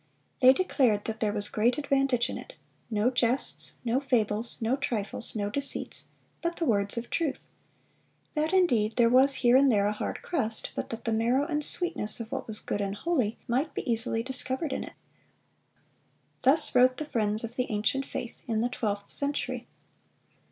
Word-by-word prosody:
They 255 0 +8
declared 260 - +1
"that 220 -1 -4
there 215 -2 +1
was 205 0 0
great 235 +3 +1
advantage 275 -4 +1
in - - -5
it; - - -11 0.4
no 220 +2 +1
jests, 250 +1 0
no 240 +3 +1
fables, 230 -4 0
no 230 +3 +1
trifles, 230 -5 -2
no 205 -1 -2
deceits, 280 +2 -4 0.4
but 340 0 -2
the 335 - -2
words 205 -4 0
of 235 +1 -5
truth; 310 -5 -2 0.9
that 310 +1 0
indeed 245 - +2
there 235 -1 +4
was 270 +2 +6
here 240 +1 +6
and 270 0 +5
there 200 -3 +2
a 205 - +1
hard 210 - -5
crust, 230 -10 0
but - - -4
that 230 0 -6
the 225 - 0
marrow 240 +5 +2
and 300 -2 -1
sweetness 325 - +1
of 230 -1 -7
what - - -4
was 220 -1 -4
good 205 - -3
and 200 0 -2
holy 250 -5 -1
might 265 +6 -1
be - - -4
easily 225 -1 0
discovered 265 +3 +1
in - - -3
it."(352) - - -12 1.5
Thus 270 +5 +4
wrote 255 0 +4
the 305 - -2
friends 215 -5 0
of 230 +1 -6
the 250 0 -1
ancient 225 +6 -1
faith, 235 - -6
in 220 -2 0
the 240 - 0
twelfth 205 -4 -3
century. 285 0 -1
240 Hz, 180 wpm, -28 LUFS, 220-275 Hz, 1.5 s, They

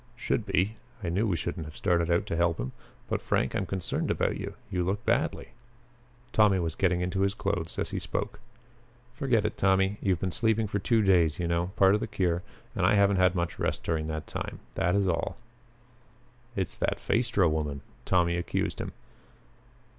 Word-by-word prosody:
"Should 115 -2 -1
be. 100 +3 +1 0.3
I 85 - -1
knew 100 +7 +1
we 90 -5 +1
shouldn't 80 -1 -4
have 75 - -11
started 85 -3 +1
out 85 0 +2
to - - -2
help 85 0 +2
him. 65 +2 -3 0.4
But, - - -1
Frank, - - 0
I'm - - -1
concerned 95 -3 -2
about - - +1
you. - - -5 0.2
You 90 -1 0
look 100 +3 -2
badly." 135 +9 0 0.8
Tommy 105 -3 +5
was 85 -3 -1
getting 90 -2 +1
into 90 +1 -1
his 100 0 +1
clothes 95 -6 -2
as - - -2
he - - -2
spoke. - - -3 0.7
"Forget 120 -5 +1
it, 105 - -2
Tommy. 95 +1 +3
You've 95 -4 +1
been 95 +1 -1
sleeping 110 +2 +2
for 100 0 -2
two 110 +3 +2
days, 85 -6 +4
you 85 - -1
know 85 +1 +1
part 95 0 +5
of 105 - +3
the - - -3
cure 90 -4 0 0.3
and 95 - -1
I 95 +4 +5
haven't 100 -1 +4
had 95 -1 +4
much 85 -1 -2
rest - - -1
during 80 -2 -1
that 80 -1 -4
time. - - -5 0.2
That 90 +2 +1
is 100 -1 +2
all." 85 -2 -1 1.2
"It's 95 -3 -2
that - - 0
Phaestra 115 -6 +2
woman," 75 -3 -1 0.2
Tommy 85 -1 +2
accused 85 - -2
him. - - -5
95 Hz, 190 wpm, -28 LUFS, 85-100 Hz, 1.2 s, Tommy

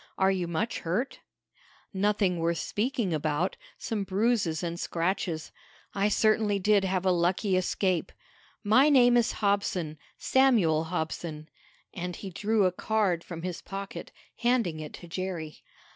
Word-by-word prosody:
"Are 190 0 +4
you 185 -2 -1
much 170 +8 -2
hurt?" 205 +11 -2 0.7
"Nothing 195 -2 +1
worth 165 0 0
speaking 215 -3 -1
about. 155 +3 0 0.2
Some 215 -3 -3
bruises 195 -5 0
and 170 0 -3
scratches. 170 -2 -2 0.4
I 200 +1 +1
certainly 215 -1 +2
did 200 +1 +3
have 190 -1 -1
a 185 - +4
lucky 180 +3 +1
escape. 185 -1 0 0.5
My 255 +8 +5
name 245 -4 +6
is 240 -2 +3
Hobson 195 -6 -1 0.2
Samuel 210 -13 +3
Hobson," 160 -2 -4 0.4
and 180 -1 -4
he 195 - -7
drew 210 +3 +1
a 185 - +3
card 190 -3 0
from 170 -2 -8
his 180 -2 -4
pocket, 195 +1 -7 0.3
handing 235 -9 +1
it 150 -1 -7
to 175 - -10
Jerry. 170 -3 -5
190 Hz, 140 wpm, -28 LUFS, 170-210 Hz, 0.7 s, name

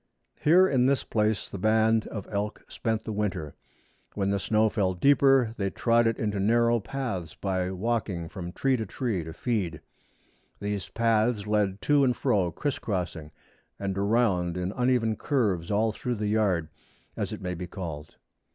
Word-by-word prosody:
Here 180 +5 +5
in 130 -5 +3
this 140 0 +2
place 105 -1 0
the 100 - -7
band 110 +2 +3
of 100 -4 -6
elk 105 +2 -3
spent 110 -2 -2
the - - -5
winter. 95 -8 -2 0.6
When 100 -1 0
the 100 - +1
snow 110 +2 +2
fell 95 -4 0
deeper 135 +1 +4
they 100 -1 0
trod 115 +3 +2
it 115 - 0
into 105 -2 -1
narrow 115 +3 +3
paths 100 - -4
by 95 -2 -1
walking 95 -3 -2
from 90 0 -7
tree 135 +7 +1
to 110 -3 -4
tree 110 -6 -2
to 80 - -7
feed. 90 -5 -2 0.8
These 100 -1 -3
paths 115 -1 +1
led 105 -2 0
to 145 -1 +4
and 125 -3 +2
fro, 95 -4 +1
criss 145 - -2
crossing, 90 -6 -3 0.5
and 100 -1 -3
around 100 -4 +1
in 90 +1 -2
uneven 125 -2 +1
curves 100 - 0
all 110 +2 +2
through 125 +2 -3
the 105 -1 -3
yard, 100 -7 +1 0.5
as - - -3
it - - -5
may 90 -1 -3
be 90 +1 -5
called. 80 -5 -7
105 Hz, 170 wpm, -27 LUFS, 95-115 Hz, 0.8 s, Here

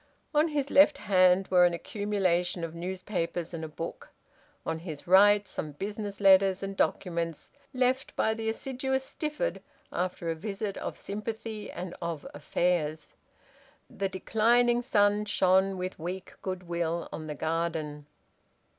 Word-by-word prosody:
On 300 +2 +4
his 285 -3 -2
left 290 +1 +6
hand 185 -1 +4
were 180 -1 +6
an 175 -1 +4
accumulation 185 -3 -1
of 165 -1 -4
newspapers 175 -1 -3
and 165 -1 -4
a - - -3
book; 160 +2 -7 0.6
on 160 - -2
his 160 -4 -7
right, 205 +2 +6
some 150 -1 -5
business 205 +4 -5
letters 195 -1 +5
and 195 0 -4
documents 170 -5 -1 0.2
left 260 +2 0
by 220 - +2
the 220 0 -2
assiduous 265 +3 -2
Stifford 305 - -3 0.3
after 180 -2 -2
a - - -2
visit 200 +3 -4
of - - -5
sympathy 215 +1 -5
and 180 0 -6
of 170 -3 -4
affairs. 155 +1 -1 0.8
The 195 -1 -2
declining 235 +5 +3
sun 210 -4 +3
shone 190 -1 +3
with 185 0 -4
weak 180 +3 -5
goodwill 170 -2 -2
on 155 - -6
the 150 - -4
garden. 155 -2 -2
190 Hz, 135 wpm, -29 LUFS, 170-215 Hz, 0.8 s, left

